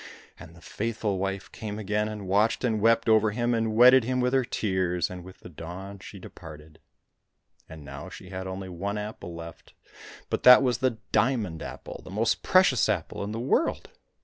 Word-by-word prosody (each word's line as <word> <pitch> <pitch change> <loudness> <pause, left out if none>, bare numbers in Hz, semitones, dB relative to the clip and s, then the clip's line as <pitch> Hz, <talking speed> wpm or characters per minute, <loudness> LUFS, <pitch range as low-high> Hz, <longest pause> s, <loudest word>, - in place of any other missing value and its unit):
And 80 - -12
the 85 - -16
faithful 105 -1 -3
wife 95 0 -4
came 105 -1 -6
again, 105 0 -1
and 105 -3 -7
watched 105 +6 +2
and 110 -4 0
wept 115 +1 +3
over 110 -1 +4
him 120 +3 -1
and 115 -1 0
wetted 125 +2 +7
him 125 +2 -1
with 125 +1 +1
her 135 -1 +3
tears, 95 -7 -1
and 90 -1 -8
with 95 +1 -14
the - - -10
dawn 90 +5 -9
she - - -11
departed. 75 -1 -12 0.9
And 80 -2 -11
now 70 0 -8
she 90 - -11
had 95 0 -6
only 95 0 -6
one 100 +3 -4
apple 105 -5 -7
left, 85 -1 -11 0.6
but - - -1
that 125 +1 +9
was 125 -3 +1
the 130 -3 0
diamond 105 -7 0
apple, - - -8
the - - -11
most 110 +4 0
precious 180 -12 +4
apple 100 -2 -2
in 100 - -4
the 110 - -4
world. 135 - 0
105 Hz, 190 wpm, -27 LUFS, 95-115 Hz, 0.9 s, that